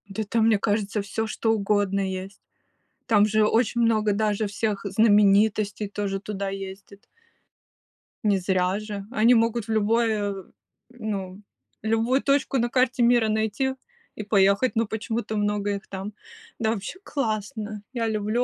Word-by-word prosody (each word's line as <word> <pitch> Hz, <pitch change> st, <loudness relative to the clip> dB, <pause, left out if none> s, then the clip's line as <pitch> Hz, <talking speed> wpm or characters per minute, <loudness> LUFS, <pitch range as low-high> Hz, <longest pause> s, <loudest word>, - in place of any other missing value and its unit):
Да 220 Hz, -, -1 dB
там, 220 Hz, +2 st, +1 dB
мне 220 Hz, -3 st, +3 dB
кажется, 205 Hz, 0 st, 0 dB
всё 220 Hz, +2 st, -3 dB
что 225 Hz, +1 st, 0 dB
угодно 200 Hz, -2 st, +1 dB
есть. 190 Hz, 0 st, -5 dB, 0.7 s
Там 210 Hz, -2 st, +4 dB
же 215 Hz, 0 st, +2 dB
очень 235 Hz, +2 st, +1 dB
много 215 Hz, -2 st, +2 dB
даже 210 Hz, 0 st, 0 dB
всех 205 Hz, 0 st, -2 dB
знаменитостей 205 Hz, 0 st, +3 dB
тоже 200 Hz, -1 st, -3 dB
туда 200 Hz, -1 st, -4 dB
ездит. 195 Hz, +1 st, -8 dB, 1.2 s
Не 205 Hz, -2 st, +2 dB
зря 185 Hz, +1 st, 0 dB
же! 210 Hz, -2 st, -6 dB
Они 230 Hz, +1 st, +4 dB
могут 230 Hz, -1 st, +1 dB
в -, -, -3 dB
любое 215 Hz, -3 st, 0 dB, 0.4 s
ну, 205 Hz, -5 st, -5 dB, 0.4 s
любую 225 Hz, +5 st, +1 dB
точку 275 Hz, -1 st, +1 dB
на 240 Hz, -1 st, +1 dB
карте 255 Hz, 0 st, +2 dB
мира 235 Hz, -1 st, +4 dB
найти 220 Hz, +5 st, 0 dB, 0.4 s
и 215 Hz, -, -5 dB
поехать, 200 Hz, +4 st, +3 dB
но 230 Hz, -, +3 dB
почему-то 220 Hz, 0 st, -3 dB
много 205 Hz, -1 st, 0 dB
их 200 Hz, -, -9 dB
там. 195 Hz, +2 st, -6 dB, 0.4 s
Да 220 Hz, -2 st, 0 dB
вообще 230 Hz, -, -5 dB
классно, 215 Hz, -, -3 dB
я 235 Hz, -3 st, -1 dB
люблю 215 Hz, +2 st, 0 dB
215 Hz, 145 wpm, -25 LUFS, 200-225 Hz, 1.2 s, Там